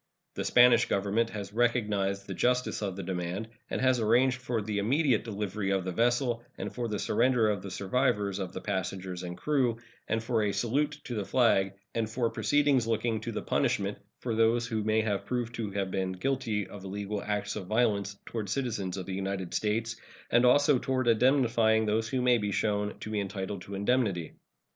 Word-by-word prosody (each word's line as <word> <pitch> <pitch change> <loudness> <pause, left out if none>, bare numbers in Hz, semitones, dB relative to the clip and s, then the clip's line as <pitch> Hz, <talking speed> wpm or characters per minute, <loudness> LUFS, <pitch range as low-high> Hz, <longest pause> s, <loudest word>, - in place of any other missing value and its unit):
The - - -3
Spanish 125 -1 +6
Government 105 +4 +1
has 100 -1 -6
recognized 105 -5 +1
the 100 - -5
justice 125 +5 0
of 100 -3 -2
the 100 - -5
demand, 95 +4 -3 0.2
and - - -2
has 130 -1 +3
arranged 125 +3 +3
for 120 -3 -1
the 105 -1 -2
immediate 130 +2 +2
delivery 105 -2 -3
of 95 -2 0
the 95 - -2
vessel, 120 +3 +1
and - - -5
for 120 -1 -2
the 105 -2 -2
surrender 115 +2 +2
of 100 -3 -3
the 100 - -7
survivors 100 0 0
of 95 -2 -4
the - - -6
passengers 95 -2 -3
and 90 -1 -6
crew, 130 -6 +1 0.3
and 110 0 -1
for 115 -1 +1
a 105 -1 0
salute 145 +5 0
to 125 - -6
the 105 -3 -2
flag, 100 -4 +2 0.2
and 115 -1 -1
for 115 0 0
proceedings 145 -5 +2
looking 115 0 0
to 115 - -4
the 110 - -4
punishment - - 0 0.3
of 115 -3 -1
those 115 +1 +3
who 110 -2 -2
may 110 +1 +2
be 105 -2 0
proved 120 +3 -3
to 115 -3 -3
have 100 -1 -2
been 95 -1 -1
guilty 115 -1 -1
of 100 -2 -10
illegal 100 +1 -4
acts 105 0 -2
of 95 -4 -6
violence 105 -3 +1
toward 110 -4 -4
citizens 105 -6 -2
of 95 - -5
the 95 - -5
United 95 -2 -3
States, 115 +2 -1 0.3
and 120 +1 +5
also 145 +1 +5
toward 130 -1 -1
indemnifying 115 -2 +3
those 110 +1 0
who 130 0 0
may 125 -1 +4
be 105 -1 -2
shown 105 +1 -1
to 110 - -5
be 105 - 0
entitled 100 -1 -4
to 100 +2 -7
indemnity. 100 -5 0
110 Hz, 195 wpm, -29 LUFS, 100-120 Hz, 0.3 s, Spanish